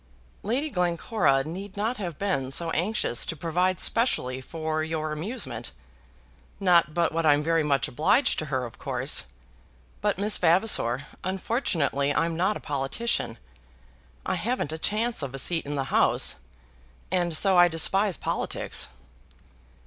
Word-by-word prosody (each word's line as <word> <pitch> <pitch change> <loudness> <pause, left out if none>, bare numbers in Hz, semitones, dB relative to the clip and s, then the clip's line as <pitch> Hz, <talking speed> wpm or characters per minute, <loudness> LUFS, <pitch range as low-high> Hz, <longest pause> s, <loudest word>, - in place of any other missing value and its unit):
"Lady 265 +9 -1
Glencora 175 - +1
need 190 +6 -7
not 225 +5 -1
have 175 -7 -5
been 185 -10 -1
so 165 +5 0
anxious 175 - +1
to - - 0
provide 175 +3 0
specially 130 - 0
for 155 +2 -3
your 155 -1 -3
amusement. 175 +12 -3 0.9
Not 170 -5 +3
but 170 -1 +1
what 165 0 -1
I'm 150 -1 +4
very 165 +1 +2
much 140 -4 +1
obliged 205 - +2
to 155 - -3
her, 130 -3 -2
of 115 - -11
course. - - +2 0.8
But - - 0
Miss 205 +2 +1
Vavasor, 165 - +3 0.2
unfortunately 175 - 0
I'm 165 0 0
not 190 +5 +1
a - - -11
politician. 135 - -1 0.9
I - - 0
haven't 235 - -1
a 160 - -5
chance 220 +4 0
of 135 -1 -5
a - - -4
seat 165 +3 +1
in 145 - -3
the 135 - -1
House, - - +2 0.7
and 175 -3 +1
so 195 +1 +4
I 175 - +8
despise 185 +2 +1
politics." - - -2
165 Hz, 145 wpm, -26 LUFS, 150-200 Hz, 0.9 s, I